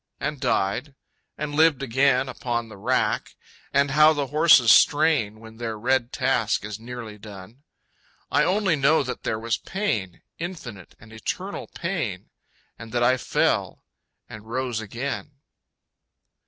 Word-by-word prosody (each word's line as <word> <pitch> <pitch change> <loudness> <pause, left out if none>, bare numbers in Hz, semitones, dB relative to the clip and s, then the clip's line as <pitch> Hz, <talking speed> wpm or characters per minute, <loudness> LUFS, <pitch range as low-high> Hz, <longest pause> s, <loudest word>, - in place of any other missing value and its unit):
And 150 -1 -3
died... 130 +2 -1 0.4
and 150 0 -4
lived 155 -3 +3
again 135 +1 +2
upon 120 -3 -3
The 110 - -11
rack... 110 0 -1 0.4
and 140 0 +2
how 155 +2 +6
the 145 -2 -1
horses 150 -5 +6
strain 145 -7 +4
When 110 0 -13
their 115 -2 -4
red 125 +2 0
task 125 -6 0
is 105 0 -6
nearly 115 -3 -8
done.... 105 +4 -12 0.7
I - - +3
only 190 -3 +2
know 145 +2 +3
that 125 -1 -5
there 110 - -2
was 115 +1 -2
Pain, 115 - -3 0.2
Infinite 135 - -7
and 110 -1 -15
eternal 185 - -5
Pain. 150 - -4 0.5
And 115 0 -10
that 120 0 +1
I 130 +2 +4
fell - - 0 0.4
and 110 0 -11
rose 125 -1 -2
again. 130 +7 -5
125 Hz, 140 wpm, -24 LUFS, 110-145 Hz, 0.7 s, how